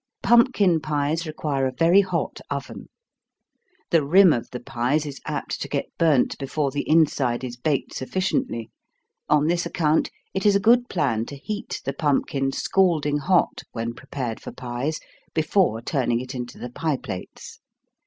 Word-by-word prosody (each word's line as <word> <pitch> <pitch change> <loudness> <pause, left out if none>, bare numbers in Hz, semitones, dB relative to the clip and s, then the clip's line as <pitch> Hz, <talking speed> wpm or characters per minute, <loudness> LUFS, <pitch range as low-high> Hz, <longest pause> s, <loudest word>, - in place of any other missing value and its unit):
Pumpkin 235 - +4
pies 155 +2 -1
require 145 -3 -1
a - - -2
very 165 +9 +5
hot 190 - -3
oven. - - -6 1.0
The 165 -4 +4
rim 180 +4 +6
of 120 - -3
the 125 - -6
pies 135 +4 -1
is 140 -2 -7
apt - - -3
to - - -3
get - - -4
burnt 155 -6 +3
before 140 +1 -1
the 145 +1 -3
inside 140 -6 +2
is 125 -1 -5
baked 140 +3 -1
sufficiently. 185 - -2 0.6
On 150 0 +4
this 170 +2 +1
account, 155 -2 +1 0.2
it 190 - -2
is 205 -1 +4
a - - +4
good 240 +4 +4
plan 120 - 0
to 145 - -7
heat 205 +8 -5
the 135 - -1
pumpkin 135 -2 0
scalding 155 -3 +1
hot 180 +5 +2
when 115 0 -3
prepared 130 -3 -5
for - - -7
pies, 125 +5 -4 0.4
before 155 - +2
turning 120 -4 0
it 130 +2 -6
into 125 -1 -6
the 125 - -7
pie 155 +2 -1
plates. 90 - -8
145 Hz, 160 wpm, -24 LUFS, 130-170 Hz, 1.0 s, rim